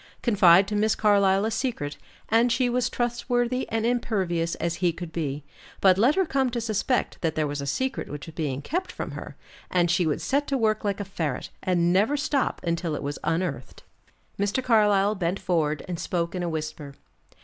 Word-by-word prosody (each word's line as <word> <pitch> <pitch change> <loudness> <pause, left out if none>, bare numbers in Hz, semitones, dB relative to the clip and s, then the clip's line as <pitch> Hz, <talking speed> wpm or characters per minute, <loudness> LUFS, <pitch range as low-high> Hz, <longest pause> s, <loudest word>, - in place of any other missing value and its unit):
Confide 190 -5 +6
to 210 - -3
Miss 215 +1 +2
Carlyle 200 -2 +3
a 225 - -1
secret, 220 - -3 0.3
and 230 +2 +3
she 245 +1 +2
was 250 0 +1
trustworthy 245 +1 -1
and 225 0 -1
impervious 190 -9 0
as 170 0 -2
he 175 -1 +2
could 170 0 -8
be; 145 -3 -3 0.4
but 190 -1 +5
let 250 +7 +4
her 380 -1 +2
come 270 -4 +1
to 240 0 -2
suspect 230 +3 -1
that 165 -2 -1
there 155 - +1
was 145 -1 -3
a 140 - -5
secret 260 - -2
which 145 0 -7
was 165 - -10
being 145 -4 -3
kept 360 - -2
from - - -5
her, - - -8 0.3
and 175 -2 +2
she 175 -1 +2
would 150 - 0
set 285 +2 0
to 275 - 0
work 215 -3 +1
like 200 -1 -1
a 205 - -3
ferret, 160 -8 -3
and 175 -1 +2
never 215 +10 +3
stop 280 -1 0
until 170 -2 -1
it - - -5
was 145 +1 -4
unearthed. 160 -5 -3 0.6
Mr. 205 +6 0
Carlyle 210 -4 +4
bent 185 -1 -2
forward 155 -4 0
and 175 -2 -4
spoke 170 -2 -2
in 180 - -3
a 175 - -1
whisper. 155 -3 -5
190 Hz, 200 wpm, -26 LUFS, 165-235 Hz, 0.6 s, Confide